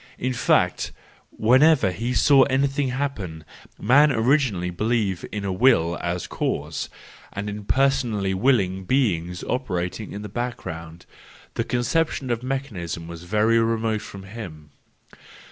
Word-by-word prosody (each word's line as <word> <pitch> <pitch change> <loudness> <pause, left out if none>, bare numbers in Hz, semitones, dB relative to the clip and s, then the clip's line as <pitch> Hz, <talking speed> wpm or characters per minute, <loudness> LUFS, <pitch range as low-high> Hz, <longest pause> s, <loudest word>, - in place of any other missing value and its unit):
I - - -12
n 130 - +1
fact, 120 - +1 0.4
whenever 130 -1 +4
he 115 +7 -3
saw 140 0 +6
anything 135 +1 +1
happen, 120 - -4 0.3
man 145 +7 +5
originally 115 -8 +1
believed 105 -1 -1
in 105 -1 -5
a 95 - -1
Will 90 -7 +3
as 85 0 -2
cause, - - -3 0.4
and 100 +1 -4
in 105 0 -6
personally 115 -7 +1
willing 95 -4 +1
beings 90 -9 0
operating 95 -5 -3
in 105 +1 -6
the - - -5
background,—the 90 -8 -7
conception 130 +2 0
of 120 -1 -1
mechanism 105 - -4
was 85 0 -9
very 110 +4 +3
remote 115 -1 0
from 100 -2 -9
him. 90 -8 -9
110 Hz, 130 wpm, -24 LUFS, 90-130 Hz, 0.4 s, saw